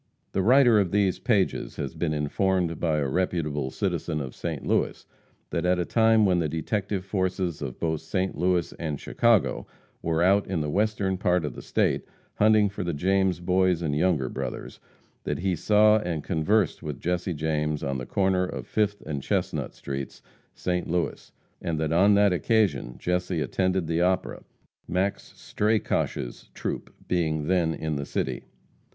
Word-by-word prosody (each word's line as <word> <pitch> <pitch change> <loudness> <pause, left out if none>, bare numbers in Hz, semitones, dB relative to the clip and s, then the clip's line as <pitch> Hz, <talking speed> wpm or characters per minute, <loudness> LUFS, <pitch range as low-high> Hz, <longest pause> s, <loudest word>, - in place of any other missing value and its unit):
The 95 - 0
writer 120 +1 +6
of 95 -3 +1
these 100 -1 +1
pages 105 -6 0
has 70 - -4
been 85 -3 -1
informed 85 +3 0
by 80 -3 +1
a 70 -2 0
reputable 75 -4 -1
citizen 75 +3 -2
of 65 -3 -5
St. - - -5
Louis, - - 0 0.5
that - - -1
at 90 0 +2
a 90 - 0
time 110 0 +4
when 90 -2 +3
the 80 -3 0
detective 95 +4 -2
forces 95 -4 -1
of 65 -4 -5
both 80 -2 -1
St. 95 +4 -2
Louis 90 0 +1
and 75 -4 -3
Chicago 115 -6 +2 0.3
were 80 0 +1
out 100 +2 +3
in 95 -3 -1
the 75 -1 -2
western 100 -1 0
part 90 -4 +2
of 75 - -4
the - - -9
State, - - 0 0.3
hunting 110 0 +5
for 100 0 -5
the 85 -3 -2
James 95 +2 +1
Boys 90 -1 +2
and 75 -3 0
Younger 80 -4 +2
Brothers, - - -6 0.4
that - - -2
he 95 0 0
saw 105 +4 +4
and 85 -7 -3
conversed 95 +2 +1
with 75 -4 -5
Jesse 90 0 -1
James 75 -1 -1
on 70 -1 -2
the 65 - -6
corner 95 -1 +1
of 90 - -5
Fifth 105 -1 0
and 75 -3 -3
Chestnut - - -2
streets, 70 0 -6 0.3
St. 90 -1 -2
Louis, 85 0 -2 0.3
and 80 -2 -2
that 80 0 0
on 100 +4 +5
that 100 -2 +4
occasion 90 - +1
Jesse 90 +2 -1
attended 95 +2 0
the 80 +1 0
opera, 95 +1 0 0.5
Max 95 +3 -1
Strakosch's 105 - -1
troupe - - -4 0.2
being 80 -4 0
then 85 -2 +1
in 80 -2 -3
the 70 - -3
city. - - -3
90 Hz, 170 wpm, -26 LUFS, 80-95 Hz, 0.5 s, writer